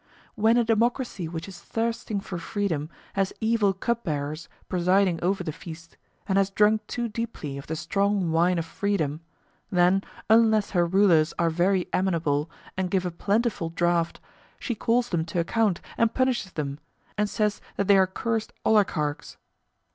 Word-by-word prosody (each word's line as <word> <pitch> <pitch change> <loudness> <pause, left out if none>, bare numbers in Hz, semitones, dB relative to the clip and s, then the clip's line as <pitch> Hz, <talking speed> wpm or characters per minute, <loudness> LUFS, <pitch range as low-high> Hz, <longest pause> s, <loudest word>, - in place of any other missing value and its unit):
When 225 +1 +3
a 240 - +4
democracy 230 -4 0
which 165 +2 -6
is 190 -3 -10
thirsting 225 0 -2
for 180 -3 -6
freedom 165 -5 -2 0.2
has 195 -1 0
evil 220 -3 +2
cup 235 +5 -2
bearers 150 0 -3 0.2
presiding 180 -1 +2
over 185 +1 +1
the 160 - -3
feast, 165 +1 -11 0.3
and 195 -1 +3
has 195 0 +2
drunk 210 +2 +3
too 240 -1 -2
deeply 220 -11 -5
of 140 - -11
the 160 - -3
strong 195 +1 0
wine 170 +2 +3
of 165 - -1
freedom, 165 -5 -1 0.5
then, 180 +2 +3 0.2
unless 220 -1 +4
her 175 -3 +2
rulers 170 -4 +4
are 170 -1 +2
very 180 +2 +1
amenable 165 -5 +1 0.3
and 185 -1 -1
give 185 0 0
a 180 - -1
plentiful 200 0 0
draught, 170 0 0 0.4
she 245 - -3
calls 240 +2 +1
them 170 -3 0
to 175 +1 -2
account 200 +2 +1 0.2
and 230 -1 +2
punishes 255 -7 0
them, 145 -2 -4 0.4
and 210 0 0
says 210 -1 0
that 200 - -1
they 200 - +7
are 190 -1 +5
cursed 225 +3 -2
oligarchs. 155 -9 +1
190 Hz, 160 wpm, -26 LUFS, 170-215 Hz, 0.5 s, they